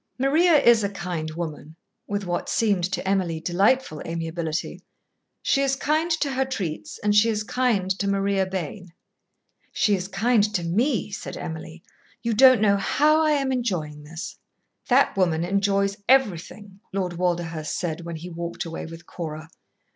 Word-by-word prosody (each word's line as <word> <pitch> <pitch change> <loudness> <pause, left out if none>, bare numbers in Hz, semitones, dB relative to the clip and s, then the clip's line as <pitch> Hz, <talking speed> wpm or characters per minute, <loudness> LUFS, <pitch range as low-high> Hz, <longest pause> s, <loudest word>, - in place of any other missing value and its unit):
"Maria 310 +7 +3
is 235 -5 +5
a 200 - 0
kind 180 -5 -4
woman" 155 -2 -6 0.3
with 205 0 -2
what 175 -1 -2
seemed 205 -5 +1
to 185 0 -3
Emily 185 -4 0
delightful 185 +1 +1
amiability. 165 -1 -4 0.6
"She 275 - +2
is 275 -1 +2
kind 310 +4 0
to 315 -4 0
her 265 0 +1
treats 195 -12 -4
and 205 0 +3
she 215 +2 +5
is 215 -1 -1
kind 210 -5 0
to 200 - -1
Maria 195 -1 +1
Bayne." 185 -1 -5 0.8
"She 210 - +2
is 185 -1 -1
kind 215 +3 +2
to 175 - 0
me," 220 - 0
said 200 - -6
Emily. 160 +1 -7 0.4
"You 230 -1 0
don't 255 0 +7
know 200 -2 +4
how 305 +10 +3
I 310 -1 +3
am 275 -2 0
enjoying 175 - -2
this." 160 +3 -8 0.5
"That - - +4
woman 170 -4 +1
enjoys 200 +1 +1
everything," 205 -5 +1
Lord 185 -2 -2
Walderhurst 170 -3 -1
said 175 -2 -3
when 170 0 -6
he 165 +2 -7
walked 170 +1 -5
away 165 -1 -6
with 165 +1 -11
Cora. 160 -1 -7
195 Hz, 160 wpm, -24 LUFS, 170-230 Hz, 0.8 s, don't